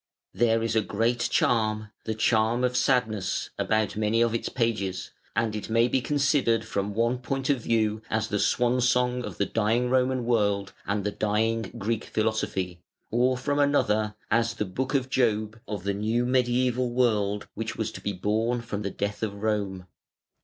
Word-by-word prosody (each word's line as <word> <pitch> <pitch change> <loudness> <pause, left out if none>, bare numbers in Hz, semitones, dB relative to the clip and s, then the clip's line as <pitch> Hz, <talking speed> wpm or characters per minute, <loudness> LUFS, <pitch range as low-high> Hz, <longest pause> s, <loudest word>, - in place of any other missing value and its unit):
There 115 +2 +2
is 115 0 -1
a 110 - +4
great 115 +3 0
charm, 110 -2 +1
the 110 - -2
charm 110 +2 +2
of 125 0 +1
sadness, 110 -7 +1
about 110 0 +1
many 110 +1 +1
of 115 -1 +1
its 115 - -2
pages, 105 -6 -1 0.2
and 110 -1 0
it 105 - -5
may 115 +1 +4
be 130 +1 +1
considered 135 -4 +2
from 100 0 -2
one 115 +2 +1
point 135 +2 -1
of 135 -4 0
view 110 -2 +1
as 110 0 0
the 105 - -1
swan's 125 +3 +2
song 125 0 +1
of - - -7
the 100 - +1
dying 115 +4 +1
Roman 130 -1 +2
world 100 -4 +1
and 100 0 0
the 105 - -1
dying 110 +1 0
Greek 110 +1 -2
philosophy, 95 -5 -1 0.3
or 125 +2 +2
from 145 +3 -1
another, 110 -7 +2 0.2
as 115 +1 +2
the 105 - -2
Book 130 +9 -3
of 130 -2 +1
Job 110 -4 0
of 105 -4 -4
the 100 0 0
new 110 +4 0
mediæval 125 0 +1
world 105 -5 +1
which 110 0 -4
was 110 -1 -2
to - - -9
be 100 - -2
born 110 +6 0
from 105 -3 -4
the 100 - -2
death 100 +1 -3
of 100 -2 -4
Rome. 100 -4 -1
115 Hz, 180 wpm, -27 LUFS, 105-125 Hz, 0.3 s, a